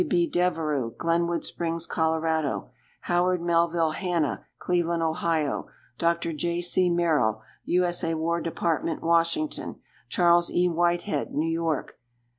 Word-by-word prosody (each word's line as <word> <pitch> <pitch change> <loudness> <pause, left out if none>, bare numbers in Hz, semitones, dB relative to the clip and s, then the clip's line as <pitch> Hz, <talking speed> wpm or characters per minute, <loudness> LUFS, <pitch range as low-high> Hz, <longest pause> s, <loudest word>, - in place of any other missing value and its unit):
B. 175 -2 +3
Devereux, 155 -9 0
Glenwood 170 0 0
Springs, 165 -1 -2
Col. 160 0 0 0.8
Howard 180 +1 +1
Melville 170 -1 +2
Hanna, 170 -3 -1
Cleveland, 170 -2 0
O. 160 -2 0 0.3
Dr. 170 0 +1
J. 170 +3 -1
C. 175 +1 +2
Merrill, 150 -11 +1 0.2
U. 180 +1 +2
S. 175 0 -2
A., 165 0 0
War 170 +2 -1
Dept., 165 -1 -1
Washington. 170 - 0 0.3
Charles 175 -1 +4
E. 180 +1 +2
Whitehead, 175 +3 0
New 155 +2 +1
York. 165 -3 -2
170 Hz, 120 wpm, -26 LUFS, 160-175 Hz, 0.8 s, Charles